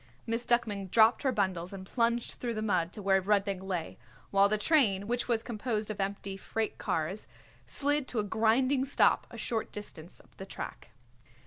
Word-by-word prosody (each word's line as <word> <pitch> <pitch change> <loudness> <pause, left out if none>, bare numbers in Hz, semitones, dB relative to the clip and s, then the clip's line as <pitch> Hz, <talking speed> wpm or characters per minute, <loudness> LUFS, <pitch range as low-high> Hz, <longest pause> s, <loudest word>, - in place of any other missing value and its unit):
Miss 230 +1 -1
Duckman 210 -5 +1
dropped 220 +4 +5
her 270 - +2
bundles 185 -5 -1
and 190 -1 -8
plunged 235 +2 0
through 235 -2 -2
the 215 - -2
mud 180 -5 +1
to 210 - -7
where 195 0 +4
Rudnik 200 -1 +1
lay, 185 -4 -4 0.3
while 200 0 +5
the 215 - +2
train, 210 -6 +3
which 245 +1 -1
was 230 -2 +1
composed 215 -2 -2
of 205 - -4
empty 195 0 -3
freight 220 +2 -3
cars, 165 +6 -2 0.4
slid 290 -1 +1
to 245 - -3
a 215 - +2
grinding 230 +6 +2
stop 275 - +3
a - - -10
short 225 -2 -2
distance 180 -5 -6
up - - -21
the 190 - -7
track. - - -7
210 Hz, 185 wpm, -30 LUFS, 195-235 Hz, 0.4 s, dropped